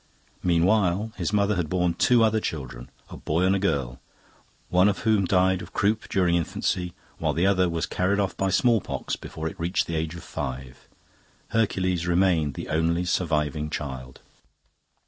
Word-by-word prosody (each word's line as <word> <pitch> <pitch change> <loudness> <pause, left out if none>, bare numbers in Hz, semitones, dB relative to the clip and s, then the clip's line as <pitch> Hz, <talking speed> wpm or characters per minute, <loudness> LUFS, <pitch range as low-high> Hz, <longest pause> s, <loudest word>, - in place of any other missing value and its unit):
Meanwhile, 90 +4 +2
his 85 -3 -2
mother 105 0 +2
had 85 -4 -1
borne 90 -1 +1
two 120 +4 +4
other 110 0 +3
children, 65 - -6 0.2
a - - -8
boy 80 +4 -1
and 95 +1 +3
a - - 0
girl, 70 -10 -1 0.7
one 90 +3 +4
of 100 - -2
whom 110 -3 +3
died 95 0 +2
of 90 - -11
croup 105 +2 0
during 90 -3 +2
infancy, 85 +1 -1 0.2
while - - 0
the 85 +3 +1
other 95 -2 +3
was 85 -1 -1
carried 95 +3 0
off 100 -2 -1
by 95 - 0
smallpox 115 +2 +1
before 80 0 -6
it - - -7
reached 85 +3 0
the 85 - -4
age 80 +1 -2
of 85 - -9
five. 65 0 -6 0.6
Hercules 95 -6 0
remained 85 -5 +2
the - - -6
only 85 +3 +1
surviving 75 -4 0
child. 65 -4 -6
90 Hz, 165 wpm, -25 LUFS, 80-95 Hz, 0.7 s, two